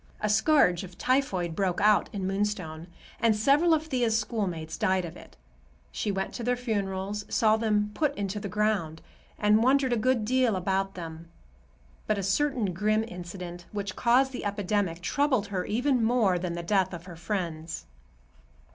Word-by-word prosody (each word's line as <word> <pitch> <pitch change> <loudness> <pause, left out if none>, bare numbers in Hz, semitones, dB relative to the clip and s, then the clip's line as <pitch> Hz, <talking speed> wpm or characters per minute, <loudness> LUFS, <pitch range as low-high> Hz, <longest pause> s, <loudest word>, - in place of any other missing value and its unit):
A 210 - -1
scourge 210 - +4
of 180 -1 -11
typhoid 190 -11 0
broke 185 -2 0
out 210 0 +4
in 200 -3 -4
Moonstone 190 -5 -2 0.3
and 230 -2 +3
several 280 +10 +3
of 315 -1 +2
Thea's 245 -7 +1
schoolmates 185 -8 -3
died 185 -1 +1
of 165 - -8
it. - - -14 0.5
She 205 - -2
went 195 0 -3
to 240 - -5
their 245 +1 +1
funerals, 205 -4 -2
saw 220 -1 +3
them 210 -2 0
put 295 +1 0
into 200 0 -3
the 200 - -5
ground, 195 -6 -1 0.3
and 210 +1 +4
wondered 260 +1 +3
a - - +1
good 235 0 +1
deal 250 -2 +2
about 195 +1 -1
them. 165 -1 -8 0.8
But 215 - +1
a 200 - -2
certain 225 -1 +1
grim 215 +4 +1
incident, 175 -2 -8
which 200 -2 -4
caused 255 +3 +3
the 255 - -6
epidemic, 205 -4 -1
troubled 265 0 +1
her 185 -2 -2
even 250 +2 +1
more 220 -6 +2
than 175 -1 -3
the 170 0 -4
death 190 0 +1
of 170 0 -10
her 175 -2 -9
friends. 165 -2 -4
205 Hz, 170 wpm, -28 LUFS, 180-230 Hz, 0.8 s, scourge